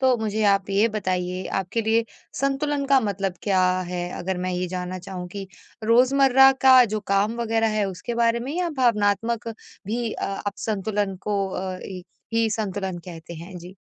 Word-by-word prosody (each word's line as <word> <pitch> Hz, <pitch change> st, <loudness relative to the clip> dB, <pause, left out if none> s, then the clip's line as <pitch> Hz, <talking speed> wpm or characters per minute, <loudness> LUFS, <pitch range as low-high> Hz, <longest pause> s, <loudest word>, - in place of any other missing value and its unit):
तो 260 Hz, -1 st, +4 dB
मुझे 220 Hz, -1 st, -2 dB
आप 195 Hz, -1 st, +2 dB
ये 205 Hz, +4 st, +3 dB
बताइए 185 Hz, -3 st, -2 dB
आपके 195 Hz, +5 st, -2 dB
लिए 225 Hz, +1 st, +2 dB, 0.4 s
संतुलन 280 Hz, +1 st, 0 dB
का 275 Hz, -1 st, +5 dB
मतलब 195 Hz, -4 st, -2 dB
क्या 190 Hz, -3 st, +2 dB, 0.2 s
है? 175 Hz, 0 st, -4 dB
अगर 185 Hz, 0 st, -3 dB
मैं 185 Hz, +1 st, -2 dB
ये 180 Hz, 0 st, -1 dB
जानना 185 Hz, 0 st, -4 dB
चाहूँ 180 Hz, -1 st, -7 dB
कि 195 Hz, +1 st, -7 dB, 0.4 s
रोज़मर्रा 265 Hz, +3 st, +6 dB
का 260 Hz, -1 st, +8 dB
जो 215 Hz, -1 st, -2 dB
काम 200 Hz, +3 st, +2 dB
वगैरह 225 Hz, -1 st, +1 dB
है 205 Hz, -, +2 dB
उसके 195 Hz, +6 st, -5 dB
बारे 235 Hz, 0 st, +2 dB
में 265 Hz, +4 st, -4 dB
या 360 Hz, -1 st, 0 dB
भावनात्मक 225 Hz, -1 st, +1 dB, 0.4 s
भी 230 Hz, +1 st, -2 dB
अ -, -, -4 dB
आप 195 Hz, +1 st, -3 dB
संतुलन 205 Hz, -2 st, -2 dB
को 200 Hz, -2 st, 0 dB
अ, 185 Hz, 0 st, -4 dB
इ 185 Hz, -2 st, -7 dB, 0.3 s
ही 225 Hz, 0 st, +2 dB
संतुलन 195 Hz, -4 st, -3 dB
कहते 170 Hz, -1 st, -9 dB
हैं, 175 Hz, +3 st, -9 dB
जी। 180 Hz, +2 st, -11 dB
205 Hz, 175 wpm, -24 LUFS, 185-230 Hz, 0.4 s, का